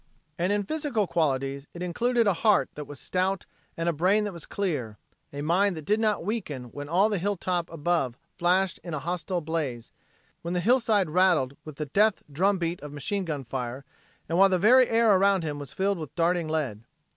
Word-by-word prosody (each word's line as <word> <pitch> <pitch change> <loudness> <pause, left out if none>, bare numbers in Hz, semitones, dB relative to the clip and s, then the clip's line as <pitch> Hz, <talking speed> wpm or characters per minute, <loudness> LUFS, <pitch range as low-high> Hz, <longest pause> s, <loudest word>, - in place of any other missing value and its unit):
And 180 +3 +1
in 205 0 +1
physical 280 -4 -1
qualities, 140 -4 -1
it 175 - -5
included 235 +7 +1
a 200 - +4
heart 215 -2 +3
that 150 - -7
was 145 -1 -9
stout 185 0 -1 0.3
and 165 0 -2
a 170 - +2
brain 185 +7 +2
that 205 -2 -3
was 170 -2 -9
clear 145 - -3 0.3
a 145 0 -5
mind 180 +3 +2
that 155 - -8
did 210 +6 +2
not 215 -6 0
weaken 150 - -4
when 145 0 -7
all 185 +5 +4
the 205 -3 -1
hilltop 180 -2 -1
above 160 -6 -1 0.2
flashed 185 +2 +1
in 170 -3 -4
a - - -2
hostile 175 +3 -3
blaze, 150 -7 -3 0.5
when 170 +2 -3
the - - +2
hillside 215 -4 +2
rattled 170 -7 +3
with 155 -2 -9
the 150 - -4
death 205 +8 +2
drum 190 +7 +2
beat 170 0 -2
of 145 - -8
machine 185 +7 -3
gun 150 -5 -3
fire 125 +1 -5 0.4
and 165 +3 0
while 195 0 +7
the 185 - +2
very 245 +7 +6
air 225 -2 +4
around 195 -1 +3
him 150 -2 -3
was 140 -2 -7
filled 195 +3 0
with 155 -4 -8
darting 170 -1 +1
lead. 145 -10 -2
175 Hz, 205 wpm, -27 LUFS, 150-200 Hz, 0.5 s, while